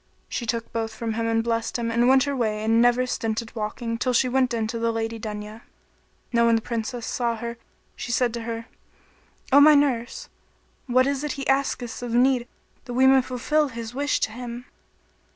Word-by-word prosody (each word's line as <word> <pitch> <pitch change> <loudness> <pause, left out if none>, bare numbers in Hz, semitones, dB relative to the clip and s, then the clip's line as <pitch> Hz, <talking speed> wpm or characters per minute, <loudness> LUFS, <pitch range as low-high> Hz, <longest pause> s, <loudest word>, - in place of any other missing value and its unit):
She 235 - -4
took 230 0 -3
both 225 -1 -2
from 230 -1 -3
him 230 +1 -1
and 225 0 +1
blessed 230 0 -1
him 230 -1 -2
and 235 +1 +3
went 265 0 +5
her 285 -1 -2
way 215 -4 -1
and 225 +1 +3
never 245 +1 +4
stinted 225 -2 -3
walking 230 +1 -3
till 255 0 0
she 255 +2 +3
went 255 0 +1
in 230 -2 -1
to 230 +1 -4
the 230 0 +1
Lady 225 0 -3
Dunya. 215 0 -7 0.7
Now 235 0 +4
when 230 - +4
the 225 - +1
Princess 235 0 -4
saw 235 -2 -1
her 235 +1 -6 0.4
she 240 - -5
said 240 -1 +1
to 235 - -4
her, 230 0 -5 0.9
"O 280 - +8
my 300 +1 +8
nurse, 255 -5 0 0.6
what 255 +1 +4
is 280 0 -1
it 300 - -2
he 275 -1 -5
asketh 270 -3 0
of 240 -1 -3
need 250 -1 +3 0.4
that 245 - -6
we 260 +1 +4
may 265 0 +6
fulfil 275 +5 0
his 230 -2 -7
wish 285 +2 0
to - - 0
him?" 240 +1 -7
235 Hz, 205 wpm, -24 LUFS, 230-255 Hz, 0.9 s, O